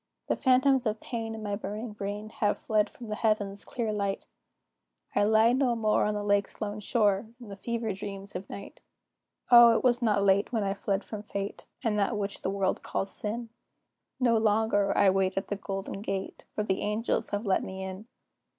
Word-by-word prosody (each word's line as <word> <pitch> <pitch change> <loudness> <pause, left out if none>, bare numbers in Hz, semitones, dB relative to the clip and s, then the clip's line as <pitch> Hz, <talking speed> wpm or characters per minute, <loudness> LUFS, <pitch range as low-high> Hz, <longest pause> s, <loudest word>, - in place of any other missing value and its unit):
The - - +3
phantoms 260 -1 +3
of 215 0 -1
pain 225 -2 -4
in 220 - -7
my 205 -1 -1
burning 215 +2 -5
brain 205 +1 -5
Have 205 -1 +2
fled 215 -1 +1
from 240 - -11
the - - -2
Heaven's 205 -3 0
clear 225 -3 -3
light; 200 -1 -2 0.9
I - - +4
lie 220 +2 +5
no 255 -2 +2
more 215 -2 +2
on 210 0 0
the 205 - -2
lake's 205 -1 +1
lone 210 -1 -3
shore, 210 -1 +1
In 235 -4 -11
the 200 - -7
fever 230 +1 -2
dreams 195 0 -7
of 185 +2 -6
night. 200 - -9 0.7
O, 235 -1 +9
it - - -3
was 245 -1 +3
not 210 -4 +2
late 200 +2 +3
when 225 -4 0
I 195 0 0
fled 200 0 -1
from 215 -2 -6
fate, 200 -1 -5 0.2
And 210 -2 +1
that 205 +2 +1
which 200 -1 -3
the - - -1
world 195 -1 0
calls 195 - -2
sin; 230 +2 -3 0.7
No 235 -3 +3
longer 215 -2 +2
"I 200 -2 +6
wait 190 0 +1
at 195 - -2
the 205 - -1
golden 195 0 -5
gate," 195 -2 -4
For 210 - 0
the 190 -2 -1
angels 220 +1 0
have 205 +2 -2
let 195 - +2
me 190 0 -6
in. 190 +3 -7
210 Hz, 200 wpm, -29 LUFS, 200-225 Hz, 0.9 s, O